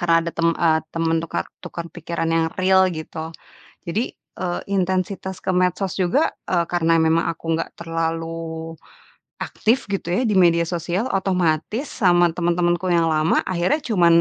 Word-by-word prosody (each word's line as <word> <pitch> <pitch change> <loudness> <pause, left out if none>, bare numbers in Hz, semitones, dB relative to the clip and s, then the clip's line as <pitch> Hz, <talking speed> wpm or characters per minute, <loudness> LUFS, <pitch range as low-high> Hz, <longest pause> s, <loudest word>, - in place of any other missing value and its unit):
Karena, 165 -1 +3
ada 170 - -2
tem 170 0 +1
eee, 160 -2 +3
teman 165 0 0
tukar 160 - -3 0.2
tukar 170 - -6
pikiran 165 -1 -3
yang 165 0 +2
real, 190 0 +5
gitu. 160 -1 -6 0.6
Jadi, 215 +9 -1 0.3
eee, 175 -1 -2
intensitas 190 0 -1
ke - - 0
medsos 180 +1 +1
juga, 190 - +2 0.2
eee, 175 -2 +2
karena 165 -1 +3
memang 165 +1 +3
aku 170 0 -4 0.2
nggak - - -4
terlalu 165 0 -4 0.7
aktif 230 +4 0
gitu 195 - -2
ya, 180 +9 +1
di 210 -5 +3
media 170 -2 +5
sosial, 175 +4 -2
otomatis 185 - 0
sama 175 -4 +3
teman-temanku 175 +1 0
yang 165 -2 +3
lama, 155 +1 +2
akhirnya 185 - 0
cuma 190 -8 +3
170 Hz, 150 wpm, -22 LUFS, 165-185 Hz, 0.7 s, real